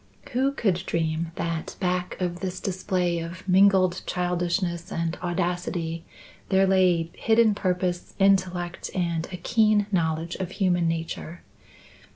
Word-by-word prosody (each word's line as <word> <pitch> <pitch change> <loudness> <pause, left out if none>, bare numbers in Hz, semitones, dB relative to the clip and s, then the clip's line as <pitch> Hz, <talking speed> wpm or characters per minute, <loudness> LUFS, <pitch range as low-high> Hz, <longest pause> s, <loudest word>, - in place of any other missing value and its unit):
Who 265 +3 +2
could 190 -9 0
dream 160 0 -1
that 165 -1 -3
back 180 -1 -1
of 175 -1 -2
this 185 -1 -4
display 180 -2 -1
of 170 +3 -7
mingled 190 -1 +4
childishness 175 0 -1
and 165 0 -1
audacity 175 -2 -2 0.4
there 190 0 +4
lay 180 -3 +3
hidden 225 -1 +3
purpose, 180 -2 -2
intellect, 185 -2 +1
and 170 -3 -1
a 180 - -5
keen 215 +2 +3
knowledge 165 -2 0
of 190 -1 -4
human 180 -4 +2
nature. 165 0 -4
180 Hz, 125 wpm, -25 LUFS, 170-190 Hz, 0.4 s, mingled